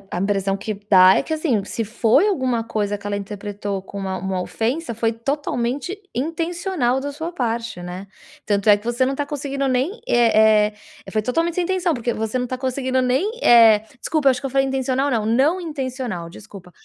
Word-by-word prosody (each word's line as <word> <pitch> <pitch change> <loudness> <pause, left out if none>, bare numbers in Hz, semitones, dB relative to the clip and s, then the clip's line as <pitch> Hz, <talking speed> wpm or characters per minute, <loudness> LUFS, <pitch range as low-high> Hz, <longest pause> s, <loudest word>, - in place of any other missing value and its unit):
a - - -1
impressão 195 0 0
que 205 +2 -4 0.2
dá 185 -1 +7
é - - +2
que 315 - -3
assim, 295 - 0
se 225 - -3
foi 235 - +2
alguma 255 - 0
coisa 205 -2 -2
que 200 - -16
ela 205 0 -1
interpretou 200 0 -5
como 195 0 -6
uma 190 0 -2
uma 190 0 -3
ofensa, 235 - -2
foi 225 0 0
totalmente 275 - -3
intencional 330 -2 -1
da 285 +1 -4
sua 320 +4 -5
parte, 230 - -3
né? 180 +2 -7 0.4
Tanto 205 0 +1
é 205 - +7
que 205 - -16
você 240 +2 +1
não 265 - 0
está 285 +1 -2
conseguindo 275 -1 -3
nem, 265 - 0
eh 220 -3 +4 0.3
eh, - - -10
foi 215 - 0
totalmente 330 +9 -1
sem 360 - 0
intenção, 365 -2 0
porque 240 -2 -2
você 220 +3 -2
não 250 - -1
está 255 +1 -4
conseguindo 260 0 -1
nem, 255 +11 +1
eh 225 -3 +7 0.2
desculpa, 305 -1 +2
eu - - +6
acho 250 - -3
que 275 - -8
eu - - -1
falei 270 +1 +2
intencional, 265 +1 0
não, 225 -4 0
não 270 +11 +2
intencional, 255 - -4
desculpa, 180 0 -13
240 Hz, 205 wpm, -21 LUFS, 210-280 Hz, 0.4 s, dá